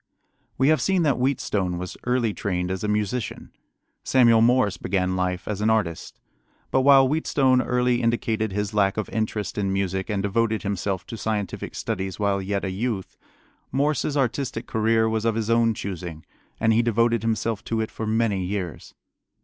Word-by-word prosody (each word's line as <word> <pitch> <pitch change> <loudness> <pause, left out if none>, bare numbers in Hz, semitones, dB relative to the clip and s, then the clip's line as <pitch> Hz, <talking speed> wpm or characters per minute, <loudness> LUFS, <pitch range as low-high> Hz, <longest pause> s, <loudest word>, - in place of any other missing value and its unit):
We 135 +2 +3
have 155 - +3
seen 190 -3 +2
that 140 -4 +2
Wheatstone 105 -9 0
was 90 +1 -6
early 125 -3 +1
trained 90 -3 -2
as 95 +1 -3
a - - 0
musician. 105 +3 -2 0.5
Samuel 115 -3 +5
Morse 120 -3 +3
began 95 -1 -1
life 90 -1 -2
as 105 -1 -3
an 110 - +2
artist. 105 -7 -1 0.5
But 130 - +3
while 135 -1 +6
Wheatstone 135 -3 +2
early 125 -1 +1
indicated 115 -2 0
his 105 +1 -2
lack 100 -1 +2
of 110 - -2
interest 105 -3 -2
in 100 -1 0
music 95 0 -1
and 100 -2 -1
devoted 110 +2 0
himself 95 -2 -2
to 115 - -7
scientific 105 -3 -3
studies 95 +1 -3
while 100 -1 +1
yet 100 +1 -2
a 95 - -2
youth, 100 0 -3 0.6
Morse's 145 +2 0
artistic 125 -2 -1
career 110 0 +2
was 110 -1 -1
of 115 -1 +1
his 115 0 -1
own 115 -1 +3
choosing, 90 -6 -6 0.3
and 110 0 +3
he 115 - +4
devoted 115 0 +2
himself 115 -1 -1
to 115 - -1
it 110 - -2
for 110 - -5
many 110 -3 +1
years. 90 -3 -5
110 Hz, 175 wpm, -24 LUFS, 95-115 Hz, 0.6 s, while